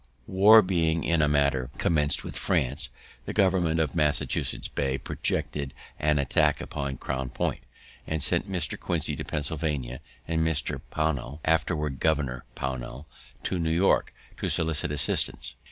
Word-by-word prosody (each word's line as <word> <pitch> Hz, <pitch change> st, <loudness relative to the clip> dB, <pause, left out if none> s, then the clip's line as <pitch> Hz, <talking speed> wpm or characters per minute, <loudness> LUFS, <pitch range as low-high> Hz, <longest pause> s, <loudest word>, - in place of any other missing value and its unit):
War 105 Hz, +4 st, +7 dB
being 85 Hz, -3 st, +1 dB
in 85 Hz, -1 st, +2 dB
a 75 Hz, -, +4 dB
manner 70 Hz, -3 st, +2 dB
commenced 75 Hz, -3 st, +1 dB
with -, -, -6 dB
France, 65 Hz, +2 st, 0 dB, 0.4 s
the -, -, -4 dB
government 90 Hz, -5 st, +3 dB
of 80 Hz, -1 st, 0 dB
Massachusetts 75 Hz, -3 st, 0 dB
Bay 70 Hz, -1 st, -1 dB
projected 70 Hz, +1 st, -2 dB, 0.2 s
an 75 Hz, 0 st, +2 dB
attack 70 Hz, -2 st, +2 dB
upon 70 Hz, -2 st, -4 dB
Crown 65 Hz, -1 st, -3 dB
Point, -, -, -2 dB, 0.5 s
and 80 Hz, -, -1 dB
sent 75 Hz, +8 st, +1 dB
Mr. 90 Hz, -2 st, -1 dB
Quincy -, -, -1 dB
to -, -, -4 dB
Pennsylvania, 70 Hz, -4 st, -3 dB, 0.3 s
and 80 Hz, 0 st, 0 dB
Mr. 80 Hz, -2 st, -1 dB
Pownall, 75 Hz, -3 st, -1 dB
afterward 75 Hz, -4 st, 0 dB
Governor 70 Hz, -6 st, 0 dB
Pownall, 65 Hz, +1 st, -5 dB, 0.4 s
to 90 Hz, -, -1 dB
New 80 Hz, -1 st, 0 dB
York, 85 Hz, +4 st, +3 dB, 0.3 s
to -, -, -2 dB
solicit 80 Hz, -2 st, +1 dB
assistance. 70 Hz, -3 st, 0 dB
75 Hz, 140 wpm, -27 LUFS, 70-80 Hz, 0.5 s, War